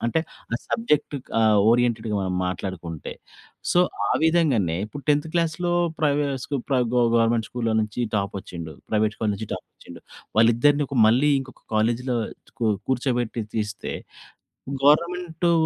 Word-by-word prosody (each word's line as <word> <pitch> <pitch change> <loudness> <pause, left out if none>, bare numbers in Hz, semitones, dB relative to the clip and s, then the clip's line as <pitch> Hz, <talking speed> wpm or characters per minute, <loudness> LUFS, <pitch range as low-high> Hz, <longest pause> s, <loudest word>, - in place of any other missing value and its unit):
అంటే 120 +7 +1 0.4
ఆ - - +2
సబ్జెక్ట్ 150 - 0 0.2
ఆహ్, 110 -2 +5
ఓరియెంటెడ్‌గా 115 -3 +1
మనం 95 -1 -2
మాట్లాడుకుంటే. 90 -3 -5 0.6
సో, 175 - +5 0.3
ఆ - - +2
విధంగానే 140 - +2
ఇప్పుడు 145 +5 -9
10థ్ 150 +2 +2
క్లాస్‌లో 170 +1 0 0.3
ప్రేవే 145 -1 +2 0.2
స్కూ 140 - -2
ప్ర 135 - +1
గ 120 - +1
గ - - +2 0.2
గవర్నమెంట్ 115 -1 +2
స్కూల్‌లో 115 -2 -1
నుంచి 105 +2 -3 0.2
టాపొచ్చిండు. 90 -5 -4 0.2
ప్రైవేట్ 110 0 +1
స్కూల్ 110 -2 0
నుంచి 105 +1 -6
టాపొచ్చిండు. - - -12 0.4
వాళ్ళిద్దరిని 120 +6 +4
ఒక 140 - -4
మళ్ళీ 130 +6 +4
ఇంకొక 130 -1 -12
కాలేజ్‌లో 120 +3 +1 0.4
కూ - - +1 0.2
కూర్చోబెట్టి 125 -3 0
తీస్తే, 105 -2 -3 0.9
గవర్నమెంటు 170 +3 +2
120 Hz, 135 wpm, -24 LUFS, 110-145 Hz, 0.9 s, ఆహ్